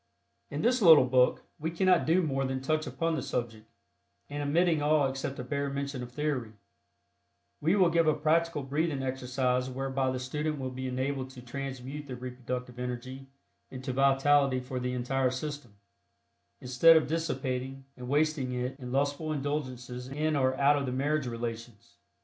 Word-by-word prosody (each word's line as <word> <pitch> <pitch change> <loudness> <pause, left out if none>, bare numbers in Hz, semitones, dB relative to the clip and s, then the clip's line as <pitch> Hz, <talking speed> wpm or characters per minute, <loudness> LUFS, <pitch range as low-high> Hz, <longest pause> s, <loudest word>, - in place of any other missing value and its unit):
In 145 +2 -4
this 250 +1 +3
little 160 -8 +8
book 125 0 +3 0.2
we 160 +2 -2
cannot 180 0 +2
do 175 +3 +4
more 135 -3 0
than 130 0 -2
touch 155 +3 -1
upon 165 0 -1
the 160 - -1
subject, 115 -3 -4 0.6
and 145 0 -3
omitting 160 +2 +2
all 150 -1 +3
except 135 +1 -4
a - - -4
bare 140 +2 -2
mention 140 -1 -4
of 120 0 -7
theory, 130 -5 -2 1.1
we 165 +6 +3
will 185 -4 +4
give 165 -1 +3
a 155 - +4
practical 160 -1 +1
breathing 145 0 -1
exercise 130 0 -1
whereby 135 0 -1
the 130 - -2
student 150 +4 -2
will 130 -1 -4
be 130 +1 -5
enabled 130 +1 -2
to 130 -1 -11
transmute 135 +2 -6
the 130 - -5
reproductive 125 0 -6
energy 125 +2 -5 0.4
into 130 0 -5
vitality 135 0 +3
for 125 0 -5
the 125 0 -2
entire 130 +1 0
system, 130 -3 -6 0.8
instead 130 +6 +6
of 155 - +2
dissipating 135 -4 -3
and 125 -1 -8
wasting 145 -3 +1
it 125 +2 -3
in 125 -2 -7
lustful 145 +3 0
indulgences 130 -4 -4
in 155 +3 -1
or 130 -2 +2
out 140 +2 +4
of 140 -1 -2
the - - -1
marriage 140 +2 0
relations. 115 -2 -6
135 Hz, 165 wpm, -29 LUFS, 125-150 Hz, 1.1 s, little